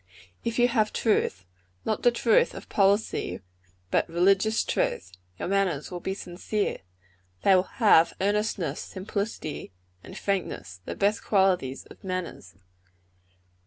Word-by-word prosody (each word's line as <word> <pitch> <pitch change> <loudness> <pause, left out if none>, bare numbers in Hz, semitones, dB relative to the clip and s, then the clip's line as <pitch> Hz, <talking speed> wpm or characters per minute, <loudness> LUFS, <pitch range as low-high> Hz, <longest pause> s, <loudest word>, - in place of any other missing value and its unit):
"If 230 -1 -2
you 245 0 +5
have 220 -3 +1
truth 95 - 0 0.4
not 215 - -1
the 245 - +6
truth 235 -2 +3
of - - -10
policy, 200 +2 +1 0.5
but - - +2
religious 195 +6 +3
truth 90 - -1 0.3
your - - -4
manners 190 -6 0
will 180 - -4
be 190 +2 -3
sincere. 195 +3 -3 0.6
They 195 - +6
will 185 +1 0
have 200 -9 +5
earnestness, 205 -2 0
simplicity 195 - -5 0.3
and - - -10
frankness 95 - -3
the - - -5
best 205 +1 +1
qualities 185 -10 +1
of - - -16
manners. 185 -7 -5
195 Hz, 125 wpm, -27 LUFS, 175-215 Hz, 0.6 s, the